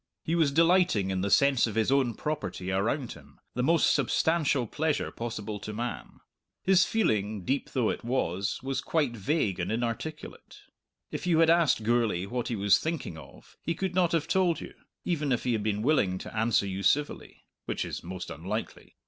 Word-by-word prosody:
He 165 - -2
was 160 -4 +3
delighting 165 - +3
in 95 -1 -1
the 100 - -1
sense 140 +1 +4
of 110 - -5
his 115 +3 +2
own 130 -5 +2
property 105 -11 -4
around 115 +7 -1
him, - - -14
the 125 - -1
most 165 +5 +3
substantial 145 0 +1
pleasure 155 +6 -1
possible 110 -3 -5
to 105 +2 -6
man. 120 +2 -5 0.4
His 185 -1 +5
feeling, 105 - 0
deep 135 +1 -1
though 120 -4 +2
it - - -6
was, 100 -6 -1
was 135 0 -2
quite 145 -7 0
vague 105 - 0
and 90 - -2
inarticulate. 120 +7 -5 0.5
If - - -4
you 170 -3 +3
had 165 0 +5
asked 165 -9 +3
Gourlay 115 -5 +1
what 120 +4 -3
he 120 - -2
was 100 -1 +4
thinking 160 - -3
of 75 -4 -14
he 165 - -2
could 190 +2 -2
not 180 -2 +2
have 160 -1 +1
told 175 -1 +2
you, - - -9 0.3
even 150 -5 -1
if 125 - 0
he 125 - +1
had 110 - 0
been 105 0 -1
willing 110 -10 +2
to - - -9
answer 110 -2 +2
you 95 0 -4
civilly 145 +10 -1 0.2
which - - -2
is - - -6
most 90 +1 -6
unlikely. 95 +9 -6
120 Hz, 190 wpm, -28 LUFS, 105-155 Hz, 0.5 s, His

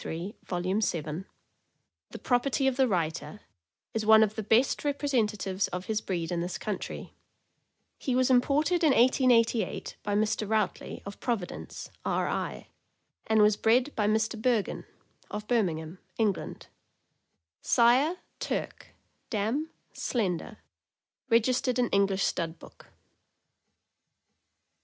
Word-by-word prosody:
16733, 175 +7 -6
volume 185 +3 0
7), 165 -2 -2 0.8
the - - -8
property 265 +2 +1
of 265 -1 +2
the 265 0 +3
writer, 175 +1 -2 0.5
is 225 - -1
one 220 0 +7
of 215 -1 0
the 220 - -4
best 225 +5 +2
representatives 220 -9 0
of 180 +1 -5
his 220 -1 -1
breed 175 -4 -3
in 175 - -1
this 175 +1 -3
country. 205 -3 -5 0.9
He 255 - -1
was 255 0 +3
imported 295 +7 +3
in 300 -4 +5
1888 240 -2 +2
by 205 0 -2
Mr. 215 0 0
Routley, 215 -3 -1
of 200 - -8
Providence, 225 -8 -4
R. - - 0
I., - - -4 0.6
and 220 -1 +4
was 210 0 +5
bred 245 +7 +2
by 210 -2 +1
Mr. 220 +1 0
Bergon, 235 -4 0 0.4
of 210 0 -6
Birmingham, 175 -7 -1 0.2
England; 210 -5 -1 1.0
sire, 255 +8 +4 0.2
Turk; - - -4 0.3
dam, 235 +9 -1 0.2
Slendor; 210 -2 -2 0.7
reg 230 -1 +5
istered 255 0 0
in 245 -2 +2
English 195 -1 +2
Stud 165 -1 -1
Book. - - -16
220 Hz, 125 wpm, -28 LUFS, 195-250 Hz, 1.0 s, one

